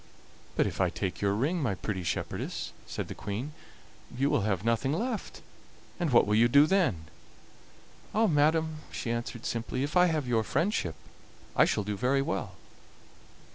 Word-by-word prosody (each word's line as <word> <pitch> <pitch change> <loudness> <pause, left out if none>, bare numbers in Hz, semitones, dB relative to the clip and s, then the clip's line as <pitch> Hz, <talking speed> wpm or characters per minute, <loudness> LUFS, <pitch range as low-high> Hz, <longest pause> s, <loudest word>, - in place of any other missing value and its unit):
"But - - +3
if - - -2
I - - +3
take 95 - -4
your 100 0 +2
ring, 155 - 0
my 115 -9 0
pretty 95 0 -3
shepherdess," 85 -3 -3
said - - -4
the - - -6
Queen, 110 +8 -4 0.7
"you 140 +3 +2
will 145 - +2
have 100 -1 -1
nothing 115 +4 +1
left; 225 - -3 0.6
and 170 -5 0
what 120 - +6
will 105 - 0
you 115 +2 +6
do 140 +4 +6
then?" 155 - +1 1.1
"Ah! 225 +1 +3
madam," 160 -2 +2
she 115 - -3
answered 120 0 -4
simply, 120 +3 -2
"if 145 +4 -3
I 180 0 +6
have 155 -6 -1
your 115 -2 +2
friendship 120 - 0 0.6
I - - +6
shall 105 - 0
do 105 +1 -3
very 135 +5 +2
well." 130 - -3
125 Hz, 170 wpm, -29 LUFS, 105-155 Hz, 1.1 s, what